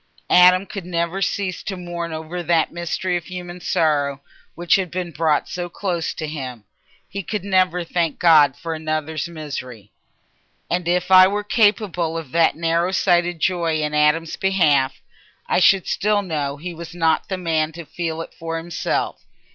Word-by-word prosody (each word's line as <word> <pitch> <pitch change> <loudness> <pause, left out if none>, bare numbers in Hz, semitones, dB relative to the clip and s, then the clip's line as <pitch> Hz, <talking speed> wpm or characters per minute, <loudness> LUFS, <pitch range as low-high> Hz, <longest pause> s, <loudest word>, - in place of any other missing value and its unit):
Adam 180 +1 +6
could 195 -1 -7
never 170 +2 -2
cease 195 -2 -1
to 195 - -5
mourn 175 -1 -5
over 160 +3 -5
that 170 -1 +1
mystery 175 +2 -2
of 170 - -8
human 180 -1 -7
sorrow 145 -5 0 0.4
which 175 +1 0
had 190 -2 -1
been 180 0 -4
brought 155 0 +1
so 175 -1 -5
close 175 -2 -3
to 160 - -4
him; 130 -7 -6 0.4
he 200 - -5
could 205 +1 -4
never 185 -2 +2
thank 165 -2 -1
God 155 -6 +5
for 165 -2 -4
another's 155 0 -3
misery. 125 - -7 0.8
And 175 -1 -1
if 180 +1 0
I 185 0 +9
were 205 +2 -2
capable 205 -6 +1
of 160 -6 -7
that 165 -1 +3
narrow 170 +1 +1
sighted 175 -2 +2
joy 170 -2 0
in 150 0 -2
Adam's 150 +2 +2
behalf, 150 -9 +2 0.4
I - - +1
should 190 0 +4
still 210 0 +1
know 145 -5 -3
he 175 +4 -6
was 170 +1 -9
not 165 -2 +1
the 190 - -2
man 160 -3 0
to 170 0 -9
feel 165 0 -4
it - - -9
for 165 0 -5
himself. 170 +1 -3
170 Hz, 170 wpm, -21 LUFS, 160-180 Hz, 0.8 s, I